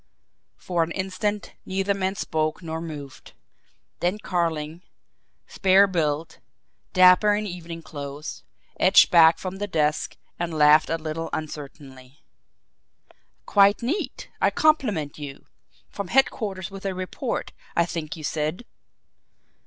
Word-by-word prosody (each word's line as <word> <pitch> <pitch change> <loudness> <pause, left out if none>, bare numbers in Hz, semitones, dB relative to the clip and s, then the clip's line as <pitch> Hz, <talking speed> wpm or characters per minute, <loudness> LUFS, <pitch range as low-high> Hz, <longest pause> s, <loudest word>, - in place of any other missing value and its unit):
For 175 -2 -1
an 165 - 0
instant 195 +3 -3
neither 195 +1 -1
man 190 0 -2
spoke 155 -1 -2
nor 160 0 -4
moved; 145 -5 -9 0.7
then 180 +4 0
Carling, 165 -4 -2 0.6
spare 195 +1 +4
built, 160 -4 -2 0.5
dapper 185 +2 +6
in 210 +1 -2
evening 170 -3 -7
clothes, 145 0 -7 0.4
edged - - +6
back 165 -2 +7
from 190 0 -6
the 205 +1 -3
desk 155 -4 0 0.2
and 170 -2 -3
laughed 150 +1 +6
a 165 - 0
little 160 +1 -5
uncertainly. 140 -3 -8 1.2
"Quite 200 +2 +4
neat! 305 - -3
I - - +5
compliment 215 - +1
you! 140 -2 -8 0.4
From 200 -2 -6
headquarters 205 -6 0
with 195 0 -9
a 190 - -3
report, 185 +7 -4 0.2
I 170 - +3
think 165 -2 -5
you 155 - -9
said?" 155 +9 -2
170 Hz, 120 wpm, -24 LUFS, 155-195 Hz, 1.2 s, back